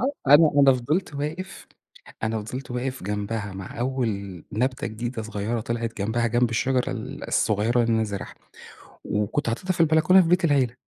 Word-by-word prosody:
آه، 255 - +3
أنا 155 0 +7
أنا 135 -1 +7
فضلت 150 +7 -1
واقف، 155 +6 -5 0.6
أنا 110 0 -1
فضلت 125 +5 -7
واقف 130 -2 -3
جنبها 105 0 -3
مع 95 +3 -8
أول 130 -1 0 0.4
نبتة 125 +2 -1
جديدة 115 +2 -4
صغيرة 110 +1 -3
طلعت 115 0 -3
جنبها 110 +4 0
جنب 120 +1 +2
الشجرة 125 +2 0
ال - - -6
الصغيرة 110 +4 +2
اللي 115 0 +1
أنا 110 0 +2
زارعها، 100 -2 -6 0.7
وكنت 105 +6 -1
حاطتها 185 +11 -1
في 175 - -7
البلكونة 160 +4 +5
في 165 - -1
بيت 180 0 +3
العيلة، 135 -6 +2
120 Hz, 165 wpm, -24 LUFS, 110-140 Hz, 0.7 s, أنا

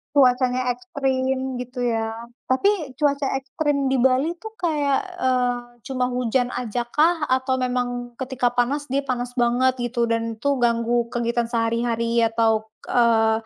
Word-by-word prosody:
cuacanya 255 -1 +3
ekstrem, 260 +1 -2
gitu, 250 0 -4
ya. 225 -1 0 0.4
Tapi, 320 +1 +2
cuaca 285 -1 +1
ekstrem 280 +1 -1
di 265 - +1
Bali, 265 +6 +2
tuh, 440 - -6
kayak, 295 -5 +1 0.2
eee, 250 -1 +1 0.3
cuma 255 -1 -1
hujan 250 0 0
ajakah, 250 +8 0
atau 260 0 +2
memang 245 -1 -2
ketika 255 -2 0
panas 255 +4 -1
dia 275 +1 0
panas 245 -1 -2
banget, 250 +2 +2
gitu, 240 -1 -1
dan 230 0 -1
itu 275 +4 0
ganggu 235 0 +1
kegiatan 235 0 0
sehari-hari 230 0 +1
atau, 225 -1 +1 0.2
eee, 225 -2 +3
250 Hz, 135 wpm, -23 LUFS, 235-265 Hz, 0.4 s, cuacanya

